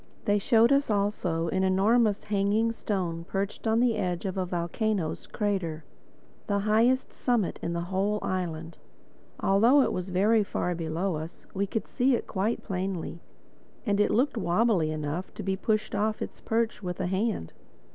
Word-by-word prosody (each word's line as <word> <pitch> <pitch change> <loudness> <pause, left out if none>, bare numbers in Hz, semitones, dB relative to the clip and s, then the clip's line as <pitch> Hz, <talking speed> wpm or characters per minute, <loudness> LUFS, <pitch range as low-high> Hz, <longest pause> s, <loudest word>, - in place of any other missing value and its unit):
They 205 0 +3
showed 230 +3 +4
us 280 -1 +3
also 200 -5 0
an 190 +3 0
enormous 205 +3 +3
hanging 210 +2 +1
stone 180 -7 -2
perched 195 +5 -3
on 220 +1 +3
the 240 -2 +2
edge 180 -2 -2
of 190 - -2
a 185 -1 -1
volcano's 175 +1 -2
crater—the 195 0 -4
highest 225 +6 +2
summit 235 -7 0
in 170 - -2
the 170 - -1
whole 195 +4 0
island. 170 -3 -3 0.6
Although 230 +9 +5
it - - 0
was 180 +1 -3
very 210 +4 +3
far 180 -2 -2
below 165 +1 -2
us, 160 +3 -8
we 200 +1 -1
could 220 - -3
see 260 0 +2
it - - -3
quite 210 +3 -1
plainly; 185 -3 -3 0.6
and 205 -2 +1
it 210 - +4
looked 255 +2 +1
wobbly 185 -3 +2
enough 155 +3 -3
to 210 - -6
be 190 0 0
pushed 215 +2 -1
off 215 +1 0
its - - -6
perch 225 -1 0
with 180 -2 -4
the - - -2
hand. 190 - -1
195 Hz, 165 wpm, -28 LUFS, 180-220 Hz, 0.6 s, Although